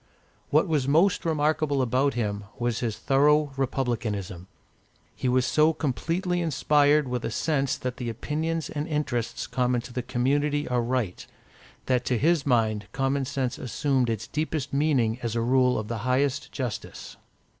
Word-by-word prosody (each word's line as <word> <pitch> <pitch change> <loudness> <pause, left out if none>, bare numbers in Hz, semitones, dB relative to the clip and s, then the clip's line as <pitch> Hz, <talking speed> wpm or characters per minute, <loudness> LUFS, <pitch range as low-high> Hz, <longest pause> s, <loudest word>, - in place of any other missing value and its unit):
What - - +3
was 150 -5 0
most 170 +8 +3
remarkable 155 -3 +1
in 130 +3 +2
him 105 -3 -2
was 120 -2 -1
his 115 -3 -2
thorough 145 +4 +3
Republicanism. 110 -9 -2 0.7
He 130 - -1
was 125 0 +2
so 155 +3 +3
completely 170 +5 -1
inspired 150 -2 +3
with 125 -1 -3
a - - -1
sense 140 -4 0
that 125 -1 -4
the 120 -2 -3
opinions 155 +7 -2
and 150 +1 -4
interests 145 -7 -2
common 125 -1 0
to 120 - -11
the 125 - -2
community 140 +4 0
are 125 -1 +1
right, 120 -6 -2 0.6
that 125 -1 +1
to 125 - +1
his 155 +3 +2
mind 110 -4 +1
common 135 +1 0
sense 130 -2 -2
assumed 130 0 0
its 115 -1 -2
deepest 155 -3 -3
meaning 135 -6 +2
as 115 -1 -3
a 115 - +1
rule 125 +1 +3
of 110 - -3
the 115 0 -3
highest 135 +4 0
justice. 125 -6 -6
130 Hz, 155 wpm, -26 LUFS, 120-150 Hz, 0.7 s, What